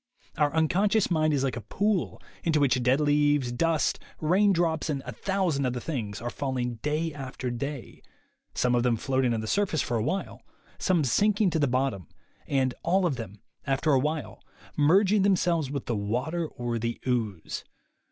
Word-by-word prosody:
"Our 150 -1 +2
unconscious 190 +6 +2
mind 155 -2 +2
is 140 -3 +1
like 135 - -1
a 120 - -5
pool 200 - -1 0.2
into 160 -2 +2
which 130 -3 +2
dead 125 +3 +3
leaves, 145 -3 +2
dust, 160 +4 +1 0.2
rain 190 +6 +3
drops 165 -3 0
and 140 -3 -2
a 125 - -5
thousand 175 - -1
other 125 0 -2
things 115 -8 -4
are 120 +1 -4
falling 125 -4 -3
day 155 +2 -1
after 130 -3 -5
day, 140 +1 -6 0.5
some 125 -1 +2
of 120 - +3
them 120 -1 +2
float 130 +2 0
ing 120 - +2
on 110 - -2
the - - -5
surface 185 - +1
for 120 - -1
a 110 - 0
while, 180 - -3 0.4
some 180 -5 +2
sinking 205 - +2
to 160 - 0
the 145 - +3
bottom 125 - -1 0.4
and, 130 -2 +1
all 185 +3 +2
of 160 -6 +1
them, 105 -3 -8 0.3
after 140 +3 +1
a 135 - +5
while, 150 -3 -3 0.3
merging 190 +7 +4
themselves 175 -6 +2
with 140 0 -4
the 120 - -1
water 125 +12 -2
or 120 -4 -4
the 115 +1 -3
ooze. 110 -9 -2
145 Hz, 180 wpm, -27 LUFS, 125-165 Hz, 0.5 s, a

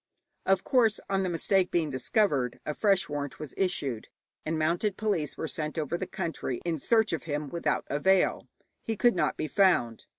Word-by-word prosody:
Of 190 0 +3
course, 235 -5 +3
on 195 0 +2
the 185 - -1
mistake 180 +2 +2
being 160 -4 0
discovered 135 - +1
a 150 - -2
fresh 195 +2 +2
warrant 145 -1 -4
was 150 - -8
issued, 145 - -1 0.4
and 160 +1 -2
mounted 175 +6 0
police 205 -9 -1
were 160 - -3
sent 155 -1 -4
over 155 +1 -1
the 180 +1 -3
country 165 - -3
in 165 -3 -1
search 220 - +2
of 165 - -3
him, 150 -2 -3
without 160 -2 -1
avail; 185 +6 +2 0.3
he 225 -1 -3
could 240 +1 +4
not 175 - 0
be 155 - -2
found. 150 - +2
170 Hz, 185 wpm, -28 LUFS, 150-195 Hz, 0.4 s, could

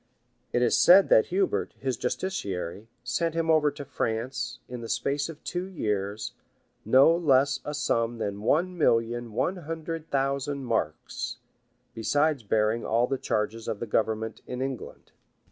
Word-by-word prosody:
} - - -44
It 120 - +2
is 120 - +3
said 190 +3 +7
that 110 - +6
Hubert, 190 +1 0
his 130 -2 -2
justiciary, 105 - -3 0.2
sent 160 +7 -1
him 165 -1 +2
over 155 -2 +4
to 145 0 -8
France, 120 0 -3
in 125 -1 -7
the 115 - -7
space 140 +7 -1
of 160 -2 -10
two 180 +1 -3
years, 105 - -3 0.5
no 135 +8 +6
less 140 -4 +3
a 150 - -4
sum 120 -5 0
than 100 -2 -3
one 175 - +1
million 115 -3 +1
one 175 - 0
hundred 165 -1 -5
thousand 140 0 -1
marks, 110 -10 -2 0.6
besides 145 +5 +1
bearing 110 +2 +1
all 115 +2 +2
the 135 +1 -2
charges 110 +1 -2
of 100 - -3
the - - -3
government 110 0 -1
in 125 - -5
England. 130 -1 -5
130 Hz, 155 wpm, -27 LUFS, 115-150 Hz, 0.6 s, said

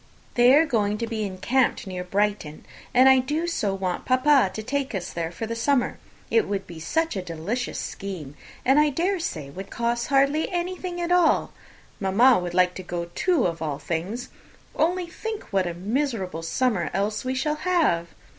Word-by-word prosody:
"They 245 +2 +6
are 315 +2 +5
going 210 -7 0
to 230 - -2
be 225 -2 -3
encamped 215 +8 0
near 185 -2 -5
Brighton; 195 -4 -1 0.3
and 255 +1 +6
I 265 0 +7
do 295 +6 -1
so 210 - -1
want 185 -2 -2
papa 255 -3 +4
to 220 - -4
take 270 0 -2
us 185 - -4
all - - -14
there 165 -1 -3
for 225 - -5
the 230 +1 -4
summer! 245 +2 +1 0.3
It 450 -2 +3
would 195 -1 -2
be 170 -2 -10
such 325 - -1
a 190 - -2
delicious 180 +8 -4
scheme, 180 -8 -6 0.3
and 270 +3 +5
I 300 0 +4
dare 350 +7 0
say 155 - -4
would 190 +5 -8
hardly 270 +6 +1
cost - - -11
anything 355 0 -3
at 345 0 -2
all. 355 -2 +3 0.5
Mamma 210 +5 +5
would 175 -1 -4
like 180 0 +4
to - - -5
go, 175 -1 -5
too, 350 -9 +2
of 170 -2 -2
all 150 -3 -2
things! 175 - -4 0.5
Only 355 +2 +1
think 435 +5 -6
what 190 -2 +2
a 170 - -4
miserable 200 - -2
summer 185 +2 0
else 210 +2 -1
we 255 +1 -2
shall 300 +3 0
have!" 305 - +1
230 Hz, 190 wpm, -25 LUFS, 185-285 Hz, 0.5 s, I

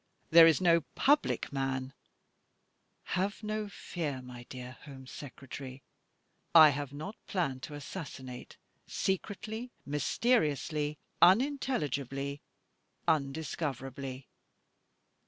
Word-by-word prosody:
There 165 0 +10
is 160 - +5
no 170 -2 +5
public 290 - +2
man 135 -1 -2 0.6
— - - -45
have 200 +4 -1
no 215 0 -2
fear, 155 -8 -4
my 120 -1 -10
dear 125 -1 -7
Home 135 -2 -10
Secretary 130 -1 -9 0.4
— - - -41
I - - +8
have 145 -1 -3
not 155 +9 -7
planned 140 -9 -1
to 145 - -7
assassinate 140 -4 -8 0.3
secretly, 220 +5 -2 0.2
mysteriously, 150 - +1 0.2
unintelligibly, 150 - +2 0.7
undiscoverably. 135 -3 -2
145 Hz, 95 wpm, -32 LUFS, 135-185 Hz, 0.7 s, There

